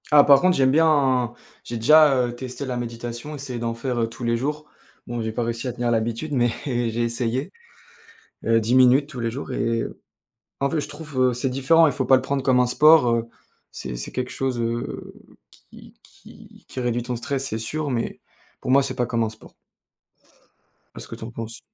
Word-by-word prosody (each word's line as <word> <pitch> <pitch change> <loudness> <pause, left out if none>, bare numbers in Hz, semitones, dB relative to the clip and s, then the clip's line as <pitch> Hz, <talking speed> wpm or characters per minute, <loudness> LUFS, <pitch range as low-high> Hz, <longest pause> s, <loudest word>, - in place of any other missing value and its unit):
Ah, 145 -1 +8
par 140 -1 +7
contre, 185 0 +3
j'aime 130 -1 +4
bien, 135 -6 +3 0.3
j'ai 120 - -5
déjà, 150 +5 +6
heu, 120 0 -5
testé 130 +2 -6
la 130 -1 -3
méditation, 120 +3 -6
essayer 135 -4 -6
d'en 115 0 -2
faire, 125 +1 -3
heu, 115 -1 0
tous 120 +1 -7
les 115 0 +2
jours. 150 +5 -3 0.4
Bon, 120 -1 -3
j'ai 110 0 -2
pas 115 - -3
réussi 115 +2 -3
à - - -2
tenir 120 0 -2
l'habitude 115 +6 -1
mais 120 -2 +2 0.2
j'ai 120 -3 -1
essayé, 120 +2 -2 1.0
heu, 115 0 +4
10 115 +3 0
minutes 130 +2 +5
tous 130 -4 -7
les 115 0 -1
jours 130 +2 -6
et 115 -2 0 0.8
en 140 - +1
fait, 160 - -1
je 150 - -4
trouve, 150 -1 -9
heu, 130 -1 +3
c'est 125 +2 -2
différent, 135 +6 +4
il 145 - 0
faut 130 0 -2
pas 135 - +6
le 130 - +2
prendre 135 0 -2
comme 130 -2 +3
un 125 - +3
sport, 150 +1 +6
heu, 115 0 0 0.4
c'est 65 -2 -6
c'est - - -6
quelque 125 0 -3
chose, 130 -2 -2
heu, 115 0 -4 0.6
qui - - -15
qui - - -17
qui - - -7
réduit 120 -1 -1
ton 125 +1 -4
stress, 135 +3 -3
c'est 110 - -3
sûr, 145 +7 -3
mais 120 -3 -3 0.4
pour - - -5
moi 135 +2 +5
c'est - - -3
pas 125 - -1
comme 115 -1 0
un 110 - -1
sport. 110 0 -15 1.4
Qu'est - - -9
ce - - -9
que - - -8
tu - - -10
en 115 - -8
penses? 115 0 -7
125 Hz, 215 wpm, -23 LUFS, 115-140 Hz, 1.4 s, Ah